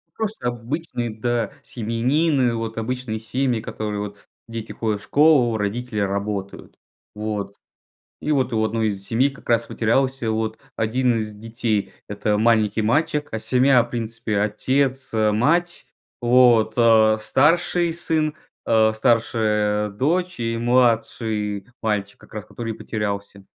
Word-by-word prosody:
Просто 215 - -3
обычные, 120 0 -3
да, 115 0 -1
семьянины, 125 +3 +1
вот 115 0 -4
обычные 115 -1 -3
семьи, 125 0 -1
которые 105 -2 -4
вот 100 0 -6 0.3
дети 115 -1 -6
ходят 105 -3 -2
в - - -15
школу, 140 -7 +4
родители 110 +2 -3
работают. 100 0 -3 0.4
Вот. 105 -1 -4 0.7
И 155 - -1
вот 130 -4 +1
у 110 0 +1
одной 110 0 0
из 100 -1 -5
семей 125 +5 +2
как 140 - -15
раз 115 0 +3
потерялся 120 0 0
вот 110 0 -2 0.2
один 120 +2 +1
из 110 -1 -3
детей- 110 -1 -2 0.2
это 105 0 0
маленький 110 -1 +2
мальчик. 145 +5 +1
А 110 - -3
семья 125 0 +4
в 120 - -12
принципе 115 -2 -3
отец, 130 +6 0
а, 110 -1 +2
мать, 170 +11 +1 0.4
вот, 120 -2 +5
а, 110 -2 +5
старший 165 +6 +2
сын, 155 -2 0 0.3
а, 110 -1 +3
старшая 105 -3 +1
дочь 170 - -1
и 115 0 -1
младший 115 -4 +1
мальчик, 105 -2 -2
как - - -18
раз 105 -1 -6
который 115 -2 -5
и - - -11
потерялся. 100 -2 -4
115 Hz, 135 wpm, -22 LUFS, 110-130 Hz, 0.7 s, вот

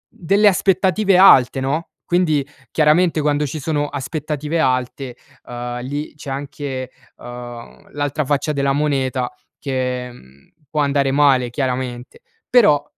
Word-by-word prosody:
delle 200 +5 +3
aspettative 190 +1 +3
alte, 135 -9 +6
no, 145 +6 -2 0.2
quindi, 160 -6 +1 0.3
chiaramente, 160 +2 +3
quando 150 0 +1
ci 155 +3 -5
sono 145 0 -1
aspettative 150 +2 -3
alte, 130 -1 -1 0.3
uhm, 120 0 -5
lì 145 +4 -5
c'è 145 -2 -9
anche, 135 -1 -5 0.3
uhm, 120 -1 -10
l'altra 145 +1 -1
faccia 145 +2 0
della 140 -1 +1
moneta, 135 -3 -1 0.3
che, 125 -2 -3
mhmm, 70 - -19 0.2
può 150 -1 0
andare 140 -1 +1
male 135 -3 +3
chiaramente. 125 -1 -4 0.3
Però 150 - +5
140 Hz, 125 wpm, -19 LUFS, 130-155 Hz, 0.3 s, alte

